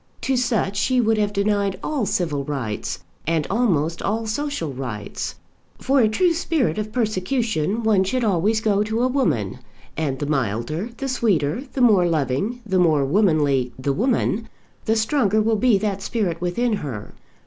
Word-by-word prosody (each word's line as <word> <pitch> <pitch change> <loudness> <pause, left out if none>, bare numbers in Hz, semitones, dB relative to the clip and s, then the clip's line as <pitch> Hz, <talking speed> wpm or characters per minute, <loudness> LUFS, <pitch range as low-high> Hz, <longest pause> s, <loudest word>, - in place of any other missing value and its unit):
To 265 - 0
such 230 -5 0
she 255 +4 +2
would 225 -2 +2
have 205 -1 +1
denied 200 -1 0
all 275 -9 -1
civil 155 -7 -1
rights, 110 -9 -4 0.2
and 160 -2 +1
almost 170 -8 +1
all 220 +2 -1
social 220 - -3
rights. 120 -6 -5 0.4
For 275 +1 +2
a 220 -4 +4
true 340 +11 +2
spirit 315 - 0
of 215 0 -4
persecution 220 - -1
one 210 -4 +3
should 245 +6 -1
always 210 +2 +2
go 205 -2 +2
to 220 +3 0
a - - +4
woman; 145 - 0 0.4
and 145 -4 -1
the 145 - -3
milder, 140 - -1
the 275 - -3
sweeter, 215 - 0
the 265 - -1
more 205 -7 +5
loving, 165 - -1
the 190 -3 +1
more 155 -5 +3
womanly 145 - +2
the 135 +2 -1
woman, 225 - 0 0.4
the 220 - +2
stronger 220 -2 +2
will 220 +1 +2
be 230 -1 +3
that 200 -1 -2
spirit 190 -7 -2
within 210 +6 0
her. 120 - -6
200 Hz, 165 wpm, -22 LUFS, 155-230 Hz, 0.4 s, more